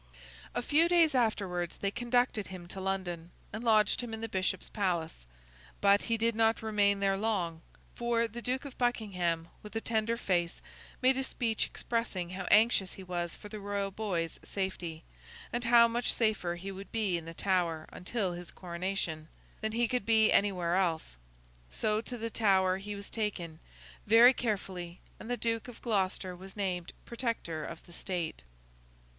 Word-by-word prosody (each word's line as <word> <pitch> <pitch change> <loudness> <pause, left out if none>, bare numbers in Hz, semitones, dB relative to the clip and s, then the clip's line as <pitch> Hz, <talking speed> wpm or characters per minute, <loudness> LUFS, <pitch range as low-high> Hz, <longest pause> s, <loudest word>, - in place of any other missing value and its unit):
A - - 0
few 315 +6 +4
days 335 -4 +5
afterwards 195 -8 0
they 200 - -1
conducted 240 -2 +1
him 180 -2 -8
to 190 - -5
London, 180 -3 -2 0.2
and 215 +2 -4
lodged 215 0 +4
him 235 -2 -4
in 220 - -8
the 225 - -2
Bishop's 185 -2 -1
Palace. 170 - -2 0.5
But, 200 0 +5
he 230 -1 0
did 230 +1 +2
not 225 +1 +2
remain 205 -2 +2
there 195 -1 +3
long; 185 -6 -1 0.3
for, 235 -1 +1
the 235 +2 -7
Duke 255 +3 -1
of 275 - -9
Buckingham 180 -9 0
with 210 +1 -11
a - - +1
tender 225 0 0
face 175 -6 0 0.4
made 260 +1 +5
a 265 - 0
speech 230 -4 -1
expressing 210 -7 -2
how 190 +1 -5
anxious 210 -3 +5
he 190 - -9
was 175 -2 -3
for 210 - -10
the 210 0 -7
Royal 200 -1 -2
boy's 185 -6 -2
safety, 180 -4 -4 0.5
and 240 +1 -1
how 235 0 +7
much 240 +1 0
safer 215 -6 +1
he 190 +3 -6
would 195 +1 -9
be 210 -5 +1
in 170 -1 -3
the 165 0 -8
Tower 170 -5 0
until 190 -1 -2
his 175 0 -7
coronation, 170 -3 -3 0.3
than 220 0 -1
he 235 +1 +2
could 245 -2 -1
be 220 -1 +5
anywhere 180 -4 +2
else. 170 - 0 0.5
So, 215 - 0
to 245 +1 -6
the 230 0 -4
Tower 190 -4 +3
he 205 +2 -5
was 200 0 -9
taken, 180 -8 -3 0.5
very 230 +4 +8
carefully, 185 -7 -3 0.2
and 225 - -9
the 245 - 0
Duke 230 -1 -1
of 245 - -10
Gloucester 190 -4 -1
was 190 +3 -11
named 180 -4 -2
Protector 230 -10 -3
of - - -8
the 175 - -15
State. 170 - -3
200 Hz, 175 wpm, -31 LUFS, 180-230 Hz, 0.5 s, very